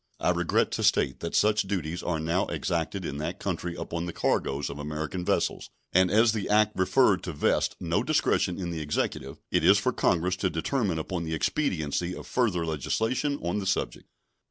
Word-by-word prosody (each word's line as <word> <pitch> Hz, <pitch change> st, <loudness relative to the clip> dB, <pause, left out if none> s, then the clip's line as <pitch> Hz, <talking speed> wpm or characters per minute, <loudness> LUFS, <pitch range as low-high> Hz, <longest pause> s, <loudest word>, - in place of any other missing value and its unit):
I -, -, +2 dB
regret -, -, +1 dB
to -, -, -2 dB
state 65 Hz, -, +2 dB
that 85 Hz, -, -4 dB
such 105 Hz, +1 st, +4 dB
duties 90 Hz, -3 st, -3 dB
are 80 Hz, -3 st, -1 dB
now 85 Hz, +4 st, 0 dB
exacted 85 Hz, +2 st, -2 dB
in 70 Hz, -, -4 dB
that 80 Hz, +6 st, -4 dB
country 85 Hz, -2 st, -3 dB
upon 85 Hz, 0 st, -4 dB
the -, -, -3 dB
cargoes 70 Hz, +2 st, 0 dB
of 70 Hz, +1 st, -6 dB
American 75 Hz, +4 st, -4 dB
vessels, -, -, 0 dB, 0.2 s
and 90 Hz, 0 st, +5 dB
as 110 Hz, +3 st, +5 dB
the 105 Hz, -3 st, -3 dB
act 105 Hz, 0 st, +3 dB
referred 95 Hz, +1 st, +3 dB
to 90 Hz, -, -5 dB
vests 75 Hz, -, +1 dB
no -, -, 0 dB
discretion 90 Hz, -, +1 dB
in 90 Hz, -3 st, -3 dB
the 80 Hz, -2 st, -4 dB
Executive, 70 Hz, -2 st, -2 dB
it -, -, +2 dB
is 95 Hz, +4 st, +7 dB
for 125 Hz, +5 st, 0 dB
Congress 90 Hz, -2 st, +1 dB
to 95 Hz, -, 0 dB
determine 95 Hz, +1 st, -1 dB
upon 85 Hz, +2 st, -3 dB
the 80 Hz, 0 st, -2 dB
expediency 85 Hz, -, -1 dB
of -, -, -9 dB
further 100 Hz, -10 st, 0 dB
legislation 115 Hz, -, -1 dB
on 85 Hz, +4 st, -1 dB
the 95 Hz, -, -4 dB
subject. 95 Hz, -, -2 dB
90 Hz, 190 wpm, -27 LUFS, 80-100 Hz, 0.2 s, is